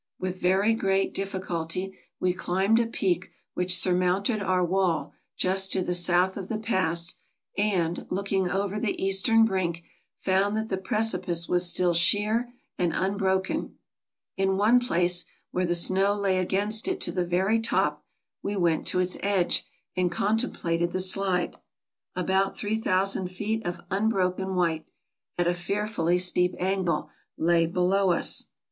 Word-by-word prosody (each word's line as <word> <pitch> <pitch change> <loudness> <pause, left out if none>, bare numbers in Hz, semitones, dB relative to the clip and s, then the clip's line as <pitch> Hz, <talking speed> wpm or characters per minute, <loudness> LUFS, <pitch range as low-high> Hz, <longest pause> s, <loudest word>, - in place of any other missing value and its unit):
With 185 0 -4
very 195 +5 +3
great 195 -3 0
diffi 195 -1 -3
culty 170 +3 -3 0.3
we 180 -1 +1
climbed 190 +5 +1
a 235 - +1
peak 185 -5 -1 0.2
which 180 0 +1
surmounted 185 +4 +1
our 185 -2 +1
wall 180 -2 0 0.2
just 190 +1 +1
to 185 - +1
the 180 - -1
south 175 +1 +2
of 195 -1 -6
the 220 - -1
pass, 180 -6 -1 0.4
and, 185 -5 0
looking 195 -1 0
over 200 +2 -1
the 215 -1 -2
eastern 200 +4 +4
brink, 175 -5 -1 0.4
found 195 +2 +1
that 220 0 -3
the 190 - -1
precipice 190 -4 0
was 180 0 +1
still 175 0 +2
sheer 210 +8 +2 0.3
and 175 -2 +1
unbroken. 190 -1 -1 0.6
In 195 0 +1
one 220 +5 +5
place, 180 -6 +1 0.3
where 180 0 0
the 175 - +2
snow 190 +4 +2
lay 195 -2 +1
against 205 - 0
it 375 0 -1
to - - +1
the 180 - 0
very 190 +6 +1
top, 225 +1 0 0.4
we 205 - -3
went 170 -4 +1
to 180 - +1
its 180 0 -1
edge 195 -3 +1 0.3
and 180 -1 +1
contemplated 175 -5 0
the 185 - -1
slide. 185 -1 0 0.6
About 190 +2 0
3000 195 -3 0
feet 210 +3 -3
of 175 0 -4
unbroken 190 -2 0
white, 165 -3 0 0.5
at 175 - +1
a 175 - +2
fearfully 180 -1 -1
steep 180 0 +2
angle, 185 -4 -1 0.3
lay 165 0 +3
below 180 +2 +2
us. - - 0
190 Hz, 150 wpm, -26 LUFS, 180-200 Hz, 0.6 s, one